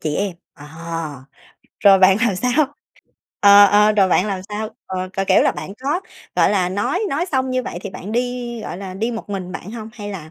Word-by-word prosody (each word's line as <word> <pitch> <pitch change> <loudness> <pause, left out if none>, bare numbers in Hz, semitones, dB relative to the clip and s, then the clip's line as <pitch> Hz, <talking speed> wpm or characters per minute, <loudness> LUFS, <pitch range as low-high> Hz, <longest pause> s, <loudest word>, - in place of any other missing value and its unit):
Chị 150 -1 -2
em. 200 -2 -1 0.2
Ờ, 145 - -13 1.1
rồi 195 -2 +7
bạn 190 0 +6
làm 230 -6 +1
sao? 270 +6 +1 0.7
Ờ, 205 0 +8
ờ, 210 +2 +4
rồi 200 -3 +3
bạn 185 - +2
làm 195 -3 -3
sao? 215 +1 -4 0.2
Ờ, 185 0 -4
kiểu, 195 0 -1
kiểu 190 -1 +4
là, - - +3
bạn 195 - -7
có, 280 - -2 0.4
gọi - - +4
là, 190 -3 +1
nói 205 - -1
nói 315 +6 -1
xong 260 -1 0
như 255 0 0
vậy 175 - -6
thì 200 - -6
bạn 205 +4 -8
đi, 245 -1 -2
gọi - - -6
là, 190 -1 -7
đi 220 +5 -2
một 225 -3 -7
mình 185 -2 -5
bạn 195 +1 -7
hông, 220 -1 -8
hay 205 -3 -7
là 165 -6 -8
205 Hz, 220 wpm, -20 LUFS, 190-240 Hz, 1.1 s, Ờ